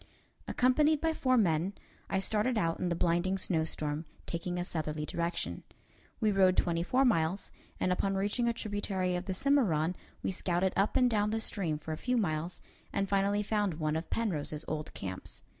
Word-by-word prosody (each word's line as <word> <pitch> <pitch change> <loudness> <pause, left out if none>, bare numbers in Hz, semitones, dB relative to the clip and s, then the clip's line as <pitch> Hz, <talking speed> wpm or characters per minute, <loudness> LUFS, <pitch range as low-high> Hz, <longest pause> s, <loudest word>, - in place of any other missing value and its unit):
Accompanied 295 +5 +3
by 325 +1 +1
four 255 -4 +2
men, 175 -2 +2 0.4
I 190 - +1
started 215 +5 +1
out 165 -5 +1
in 180 - 0
the 170 - 0
blinding 175 +3 +1
snowstorm, 160 -3 -1 0.2
taking 175 +1 -3
a 175 - -1
southerly 155 -3 -3
direction. 170 +2 -2 0.6
We 215 -3 +3
rode 190 -2 +4
twenty 170 -1 +2
four 255 +10 +3
miles, 185 -4 +1 0.3
and 185 - +1
upon 195 +2 +1
reaching 205 +5 0
a - - +1
tributary 205 -5 -1
of 180 +1 -3
the 190 - -2
Cimarron, 185 - +2 0.3
we - - 0
scouted 180 0 0
up 195 +2 +2
and 250 - +5
down 210 -3 +2
the 220 +1 0
stream 180 -8 -1
for 155 +1 -7
a 155 - -2
few 250 +6 0
miles, 170 -4 -1 0.3
and 195 - 0
finally 200 +1 +2
found 205 -4 0
one 155 -1 -1
of 160 +1 -3
Penrose's 155 -8 -2
old 155 -1 -3
camps. 95 -1 -5
185 Hz, 180 wpm, -31 LUFS, 165-210 Hz, 0.6 s, and